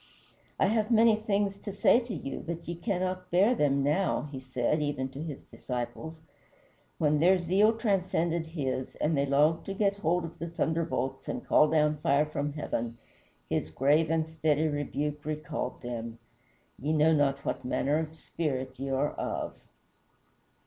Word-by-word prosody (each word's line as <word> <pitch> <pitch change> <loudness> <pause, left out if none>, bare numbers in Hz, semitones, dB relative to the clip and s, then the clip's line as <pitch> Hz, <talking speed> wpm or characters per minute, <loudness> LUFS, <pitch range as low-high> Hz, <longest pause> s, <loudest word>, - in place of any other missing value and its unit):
"I - - +4
have 215 +2 +1
many 225 -1 +6
things 205 -2 0
to 205 - -6
say 200 +4 +4
to 235 -3 -6
you, 135 -3 -5
but 170 0 -6
ye 170 - -2
cannot 185 0 -2
bear 195 +7 +4
them 140 - +2
now," 155 +7 +1
he 135 - -5
said 130 +3 -1
even 145 -3 -1
to 135 +2 -8
his 155 -4 -6
disciples. 155 +6 -6 0.7
When 150 -1 +2
their 185 +4 +5
zeal 195 +6 +3
transcended 175 -6 0
his, 135 -5 -3
and 155 +1 0
they 140 0 +1
longed 150 +4 +3
to 195 - -4
get 200 -1 +1
hold 175 -1 +1
of 165 - -10
the 170 - -4
thunderbolts 160 -5 -2
and - - -4
call 155 - +5
down 150 -1 +2
fire 145 0 +2
from 145 -1 -3
heaven, 120 -6 -3 0.5
his 80 - -1
grave 145 - +2
and 160 -1 +1
steady 160 -1 +1
rebuke 145 0 -2
recalled 150 -4 -4
them: 115 -1 -5 0.6
"Ye 150 +4 -1
know 155 +1 +4
not 140 -2 +1
what - - -2
manner 140 +4 +1
of 160 0 -5
spirit 130 -6 -4
ye 135 0 -3
are 135 +2 +1
of." - - -3
155 Hz, 165 wpm, -29 LUFS, 140-175 Hz, 0.7 s, many